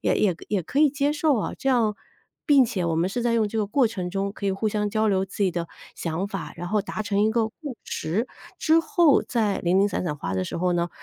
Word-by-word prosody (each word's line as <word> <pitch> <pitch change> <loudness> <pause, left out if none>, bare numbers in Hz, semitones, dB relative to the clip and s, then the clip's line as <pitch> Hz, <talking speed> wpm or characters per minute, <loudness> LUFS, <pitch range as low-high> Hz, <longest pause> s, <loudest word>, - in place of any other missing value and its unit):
也 - - +2
也 190 -5 +2
可 - - -14
也 200 -4 0
可 270 - -3
以 300 -1 +5
接 285 +1 0
受 300 -3 +2
啊， - - -3
这 270 - -1
样 225 -5 +2 0.5
并 280 -4 +6
且 205 -7 -2
我 165 -1 0
们 170 +3 +1
是 240 +5 -3
在 235 0 +1
用 220 -2 +2
这 225 - -3
个 210 - +1
过 245 +3 +2
程 185 -5 -4
中 195 +1 -2
可 200 - -5
以 195 - +2
互 215 +3 -1
相 210 0 -1
交 215 +1 +1
流 190 -1 +2
自 200 +1 -4
己 190 - +3
的 170 -1 -3 0.3
想 170 +4 -3
法， 195 -3 -5
然 175 0 -5
后 210 +1 +1
达 215 +1 -4
成 205 -1 0
一 215 - +4
个 225 -2 +1
共 280 +2 -8
识。 205 +11 -2 0.3
之 320 +1 +4
后 340 -4 +4
再 220 -5 0
零 180 +2 +2
零 205 - +3
散 190 - -2
散 150 -3 -2
花 90 -9 -4
的 95 0 -1
时 - - -5
候 180 +1 +1
呢， 175 0 0
210 Hz, 295 characters per minute, -25 LUFS, 185-240 Hz, 0.5 s, 并